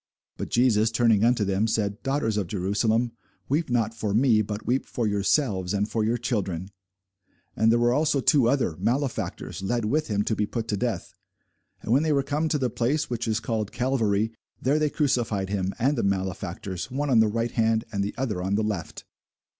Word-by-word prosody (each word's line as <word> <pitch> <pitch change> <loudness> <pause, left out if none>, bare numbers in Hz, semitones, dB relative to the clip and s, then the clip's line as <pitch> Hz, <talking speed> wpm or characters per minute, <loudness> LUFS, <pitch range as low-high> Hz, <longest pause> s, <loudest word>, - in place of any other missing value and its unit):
But - - -5
Jesus 115 -3 +3
turning 115 -2 +3
unto 120 -2 +3
them 100 +3 +1
said, 105 -1 -1
Daughters 135 -5 0
of 100 -4 -1
Jerusalem, 110 +5 0 0.4
weep 150 +3 0
not 115 -2 +1
for 110 -3 -2
me, 115 -2 +4
but 105 0 -5
weep 130 +2 0
for 120 - -2
yourselves, 100 -2 +1
and 100 +1 0
for 110 0 -1
your 115 +3 +1
children. 100 -6 -2 0.8
And 110 +1 +3
there 115 - +4
were 120 +1 +3
also 150 0 +2
two 135 -3 +4
other, 125 - +1
malefactors, 125 0 -2
led 115 +3 -1
with 150 +8 0
him 105 -1 0
to 110 - -1
be 105 - 0
put 115 0 -4
to 105 - +1
death. - - -3 0.7
And 110 - 0
when 135 - +4
they 155 -1 +1
were 140 -1 +2
come 150 +3 -1
to 150 - +1
the 130 -4 -1
place, 125 +6 0
which 120 -1 -2
is 110 0 +1
called 110 -3 -2
Calvary, 110 -4 0 0.3
there 140 +4 +1
they 155 -1 +2
crucified 120 -10 0
him, 95 -2 -1
and 135 +5 +2
the 120 - 0
malefactors, 95 -1 -3
one 140 +2 -2
on 120 - +5
the 110 - +5
right 115 +2 -1
hand, 110 -1 +1
and 100 -2 -1
the 100 - -4
other 115 -8 -2
on 95 +2 0
the 110 - +1
left. 100 -7 -4
115 Hz, 200 wpm, -26 LUFS, 105-125 Hz, 0.8 s, on